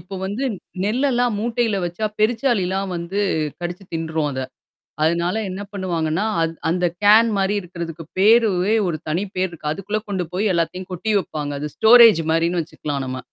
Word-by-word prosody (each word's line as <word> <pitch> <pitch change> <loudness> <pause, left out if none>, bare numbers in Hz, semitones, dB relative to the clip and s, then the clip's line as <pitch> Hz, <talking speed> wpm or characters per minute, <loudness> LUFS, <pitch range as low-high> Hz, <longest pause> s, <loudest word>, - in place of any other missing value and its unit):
இப்போ 195 +1 -10
வந்து 210 +8 -3 0.4
நெல்லெல்லாம் 245 +1 +1
மூட்டையில 230 -1 0
வச்சா 175 +5 -3
பெருச்சாளிலாம் 210 -5 +1
வந்து 170 +4 -4 0.4
கடிச்சு 175 +2 -5
தின்ட்ரும் 160 -2 -1
அத. 130 - -3 0.6
அதனால 170 +4 +1
என்ன 190 +2 -5
பண்ணுவாங்கன்னா, 175 -2 -1 0.2
அது 165 - 0 0.2
அந்த 180 +1 0 0.2
கேன் 220 +3 +7
மாரி 195 +1 +1
இருக்கிறதுக்கு 170 -2 -7
பேருவே 210 -1 +4
ஒரு 170 -3 -1
தனி 165 +5 0
பேர் 185 0 0
இருக்கு. 150 -3 -5
அதுக்குள்ள 195 +5 -3
கொண்டு 190 -2 -1
போய் 205 +3 +1
எல்லாத்தையும் 180 +3 -2
கொட்டி 185 +5 -2
வைப்பாங்க. 150 -6 -4
அது 150 - -3
ஸ்டோரேஜ் 225 -6 +7
மாரின்னு 170 +2 +1
வச்சுக்கலாம் 145 -3 -5
நம்ம. 130 0 -4
185 Hz, 155 wpm, -21 LUFS, 165-215 Hz, 0.6 s, கேன்